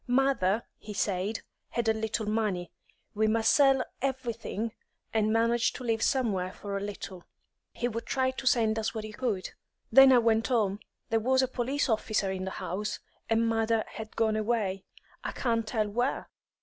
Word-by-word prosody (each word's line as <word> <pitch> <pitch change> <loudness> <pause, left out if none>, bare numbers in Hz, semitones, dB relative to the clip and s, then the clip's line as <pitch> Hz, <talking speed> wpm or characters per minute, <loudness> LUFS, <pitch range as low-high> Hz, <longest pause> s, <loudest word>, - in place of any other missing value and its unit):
Mother, 245 -5 +2 0.2
he 210 -1 -8
said, 200 +2 -1 0.3
had 235 -1 -2
a 220 - +5
little 220 0 -2
money; 210 -5 -1 0.4
we 220 +1 +2
must 225 +1 +3
sell 270 -2 +5 0.2
everything 235 -4 -2 0.4
and 215 -1 +2
manage 230 +1 +2
to - - -7
live 225 -2 0
somewhere 200 -10 +1
for 200 -1 -6
a - - 0
little; 195 -3 -6 0.5
he 240 - -2
would 230 -1 -5
try 260 -1 +1
to 260 0 -5
send 225 -3 +3
us 220 +1 -2
what 220 - -3
he 215 0 -7
could. 210 -6 -2 0.4
Then 270 0 +9
I 255 - +7
went 225 -1 +3
home. 210 -5 +1 0.3
There 225 - +3
was 260 +3 +3
a - - +2
police 260 +3 -1
officer 215 -4 0
in 190 0 -3
the - - -2
house, 195 +3 -3 0.3
and 225 0 +3
mother 225 0 +1
had 220 0 -8
gone 220 -1 +2
away, 215 -4 -1 0.4
I - - -3
can't 230 -3 0
tell 215 -1 0
where. 245 +6 -1
225 Hz, 175 wpm, -29 LUFS, 210-240 Hz, 0.5 s, Then